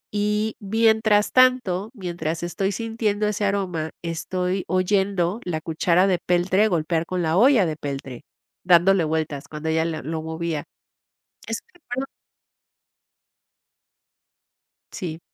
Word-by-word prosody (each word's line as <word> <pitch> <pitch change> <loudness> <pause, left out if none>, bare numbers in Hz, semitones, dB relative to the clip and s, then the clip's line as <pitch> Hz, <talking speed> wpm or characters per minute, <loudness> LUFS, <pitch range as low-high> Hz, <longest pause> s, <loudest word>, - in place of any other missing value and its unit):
Y 210 +1 0
mientras 220 0 +3
tanto, 250 -7 +3
mientras 170 -4 -4
estoy 195 +3 -1
sintiendo 215 -1 -1
ese 210 0 -2
aroma, 185 -6 -1
estoy 180 +3 -2
oyendo 190 +1 +1
la 165 -3 -2
cuchara 170 +3 +2
de 185 -3 +2
peltre 185 +4 +2
golpear 165 -2 0
con 180 -1 -2
la 160 +1 +1
olla 240 -3 +5
de 160 -2 -2
peltre, 135 -4 -6 0.4
dándole 180 +1 +5
vueltas 155 -2 -2
cuando 155 +1 -4
ella 160 0 +2
el 165 - -1
lo 160 0 -3
movía. 160 -1 -3 0.8
Ese - - -2
recuerdo 270 -6 -5 2.9
Sí. 165 -4 -5
180 Hz, 115 wpm, -23 LUFS, 160-205 Hz, 2.9 s, olla